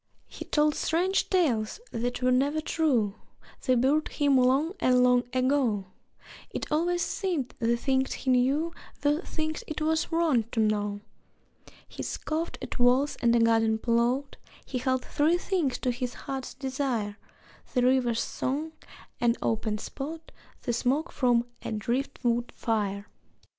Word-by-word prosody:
He -, -, -9 dB
told 300 Hz, 0 st, +2 dB
strange 360 Hz, +6 st, +1 dB
tales 270 Hz, -, +1 dB
that 245 Hz, +2 st, -3 dB
were 255 Hz, -, +4 dB
never 280 Hz, +5 st, +2 dB
true 260 Hz, -10 st, +1 dB, 0.5 s
(They 255 Hz, -, +3 dB
buried 275 Hz, +6 st, +2 dB
him 285 Hz, -2 st, +2 dB
long 265 Hz, +7 st, +3 dB
and 250 Hz, 0 st, +4 dB
long 250 Hz, 0 st, +4 dB
ago!) 255 Hz, -6 st, +1 dB, 0.6 s
It -, -, -5 dB
always 345 Hz, +3 st, +1 dB
seemed 345 Hz, -, -2 dB
the 235 Hz, 0 st, +2 dB
things 265 Hz, +1 st, 0 dB
he 265 Hz, -, -1 dB
knew 275 Hz, +7 st, +2 dB, 0.3 s
Were 295 Hz, +3 st, +2 dB
things 315 Hz, -3 st, -3 dB
it 310 Hz, -, -4 dB
was 315 Hz, +2 st, 0 dB
wrong 320 Hz, -9 st, +2 dB
to 225 Hz, -, 0 dB
know. 205 Hz, -1 st, 0 dB, 0.9 s
He -, -, -8 dB
scoffed 320 Hz, +2 st, -3 dB
at -, -, -5 dB
walls 255 Hz, +4 st, +3 dB
and 235 Hz, -1 st, +4 dB
a -, -, +4 dB
garden 225 Hz, -1 st, +3 dB
plot; 240 Hz, +4 st, 0 dB, 0.3 s
He 255 Hz, -, -3 dB
held 260 Hz, 0 st, 0 dB
three 310 Hz, +4 st, +2 dB
things 350 Hz, -8 st, 0 dB
to 250 Hz, -, 0 dB
his 245 Hz, 0 st, -4 dB
heart's 265 Hz, -2 st, -6 dB
desire: 255 Hz, -6 st, -2 dB, 0.6 s
The 250 Hz, -, +3 dB
river's 250 Hz, -2 st, +2 dB
song, 295 Hz, +5 st, -3 dB, 0.5 s
an 240 Hz, -1 st, +3 dB
open 220 Hz, -1 st, 0 dB
spot, 315 Hz, +8 st, -7 dB, 0.3 s
The 240 Hz, -, -1 dB
smoke 260 Hz, +7 st, 0 dB
from 240 Hz, -3 st, +2 dB, 0.2 s
a -, -, -5 dB
driftwood 240 Hz, +1 st, -1 dB
fire. 205 Hz, -3 st, -1 dB
255 Hz, 145 wpm, -28 LUFS, 235-300 Hz, 0.9 s, were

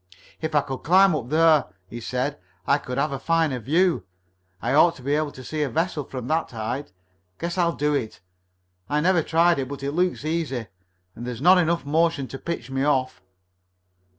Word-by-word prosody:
"If 155 Hz, -1 st, -3 dB
I 145 Hz, -, +5 dB
could 135 Hz, -1 st, -5 dB
climb 190 Hz, +3 st, +5 dB
up 120 Hz, -5 st, -4 dB
there," 155 Hz, -2 st, +4 dB, 0.2 s
he 120 Hz, +4 st, -8 dB
said, 125 Hz, +1 st, -2 dB, 0.3 s
"I 140 Hz, -, +3 dB
could 125 Hz, -2 st, -6 dB
have 150 Hz, -, +1 dB
a 135 Hz, -, -3 dB
fine 165 Hz, -2 st, +1 dB
view. 165 Hz, -, +2 dB, 0.6 s
I -, -, -1 dB
ought 165 Hz, +3 st, +5 dB
to 130 Hz, -, -14 dB
be 140 Hz, +2 st, 0 dB
able 150 Hz, -1 st, 0 dB
to 130 Hz, -, -10 dB
see 155 Hz, +3 st, -4 dB
a 145 Hz, -, 0 dB
vessel 160 Hz, +1 st, -1 dB
from 125 Hz, -2 st, -6 dB
that 160 Hz, +3 st, 0 dB
height. 120 Hz, +5 st, -4 dB, 0.5 s
Guess 170 Hz, +2 st, -3 dB
I'll 170 Hz, -1 st, +2 dB
do 150 Hz, +1 st, 0 dB
it. 125 Hz, -7 st, -3 dB, 0.7 s
I 150 Hz, -, +1 dB
never 175 Hz, +2 st, +3 dB
tried 165 Hz, +1 st, +3 dB
it, 130 Hz, -, -2 dB
but 140 Hz, 0 st, -7 dB
it 140 Hz, -, -1 dB
looks 175 Hz, -1 st, 0 dB
easy, 155 Hz, -7 st, -2 dB, 0.5 s
and 120 Hz, +2 st, -7 dB
there's 125 Hz, -2 st, -5 dB
not 180 Hz, +6 st, +6 dB
enough 170 Hz, -2 st, +1 dB
motion 155 Hz, -2 st, +1 dB
to 135 Hz, -, -7 dB
pitch 150 Hz, -7 st, -5 dB
me 135 Hz, 0 st, -1 dB
off." 130 Hz, -7 st, 0 dB
150 Hz, 200 wpm, -24 LUFS, 130-165 Hz, 0.7 s, not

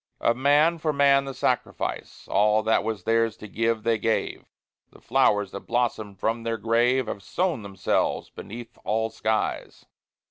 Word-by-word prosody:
Of 115 Hz, -, +2 dB
man 145 Hz, +6 st, +3 dB
for 155 Hz, 0 st, 0 dB
man 140 Hz, -1 st, +4 dB
the 135 Hz, -, -5 dB
sacrifice, -, -, -2 dB
All 105 Hz, +1 st, +3 dB
that 110 Hz, 0 st, +2 dB
was 110 Hz, -2 st, -3 dB
theirs 115 Hz, -1 st, +1 dB
to 105 Hz, -, -10 dB
give, 115 Hz, +1 st, -1 dB
they 115 Hz, -1 st, +1 dB
gave. 110 Hz, +1 st, -1 dB, 0.4 s
The -, -, -18 dB
flowers 105 Hz, -2 st, +2 dB
that 100 Hz, -, -8 dB
blossomed 110 Hz, -5 st, -1 dB
from 115 Hz, +3 st, -1 dB
their 115 Hz, 0 st, -2 dB
grave 120 Hz, +4 st, +2 dB
Have 100 Hz, -, -5 dB
sown 170 Hz, -, -1 dB
themselves 100 Hz, -2 st, -1 dB
beneath 120 Hz, +3 st, -10 dB
all 110 Hz, +1 st, -1 dB
skies. 110 Hz, 0 st, -2 dB
115 Hz, 155 wpm, -25 LUFS, 110-125 Hz, 0.4 s, man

